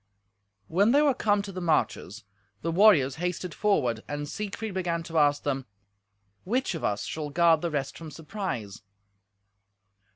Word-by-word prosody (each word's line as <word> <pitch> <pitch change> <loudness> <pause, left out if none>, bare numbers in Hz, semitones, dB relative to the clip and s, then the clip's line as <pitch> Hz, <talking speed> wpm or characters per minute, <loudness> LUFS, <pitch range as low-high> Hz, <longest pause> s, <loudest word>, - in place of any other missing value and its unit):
When 200 - +3
they 290 +2 +5
were 285 -2 +4
come 205 -4 +1
to 200 - -7
the 185 -1 -6
marches, 120 - -1 0.4
the 165 - 0
warriors 165 -8 +5
hasted 180 0 -3
forward, 130 - +1
and 145 0 -4
Siegfried 210 +4 -5
began 175 -3 -2
to 165 -1 -1
ask 145 -1 +3
them, 135 -2 -2 0.8
"Which 245 +3 -1
of 165 - -6
us 100 0 -1
shall 155 -2 -4
guard 165 +1 +4
the 170 - -1
rest 145 -3 -3
from 165 -1 -8
surprise?" 150 - -5
165 Hz, 155 wpm, -27 LUFS, 145-195 Hz, 0.8 s, they